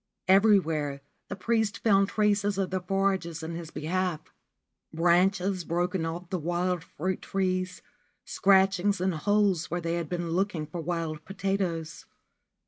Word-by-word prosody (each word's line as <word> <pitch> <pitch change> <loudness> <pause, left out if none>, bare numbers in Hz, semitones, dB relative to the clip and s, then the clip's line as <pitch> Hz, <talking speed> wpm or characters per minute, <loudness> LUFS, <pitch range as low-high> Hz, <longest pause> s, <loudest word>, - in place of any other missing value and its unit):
Everywhere 165 -8 +3 0.3
the - - -5
priest 220 +1 0
found 195 -3 +3
traces 205 -1 +1
of 190 -2 -1
their 185 - 0
forages 185 -3 -1
in 165 +1 -5
his 165 -1 -6
behalf, 165 +1 -3 0.3
— - - -57 0.2
branches 180 +3 +2
broken 175 0 -1
off 170 +2 -6
the 185 - -1
wild 175 +1 -1
fruit 185 +3 -4
trees, 185 -1 -2 0.4
scratchings 195 0 +3
and 185 0 0
holes 195 0 +1
where 175 - -1
they 165 -1 -2
had 170 -2 -3
been 175 -2 -3
looking 180 -3 -1
for 165 +3 -6
wild 160 -2 -3
potatoes. 190 -4 -3
180 Hz, 140 wpm, -28 LUFS, 165-195 Hz, 0.4 s, Everywhere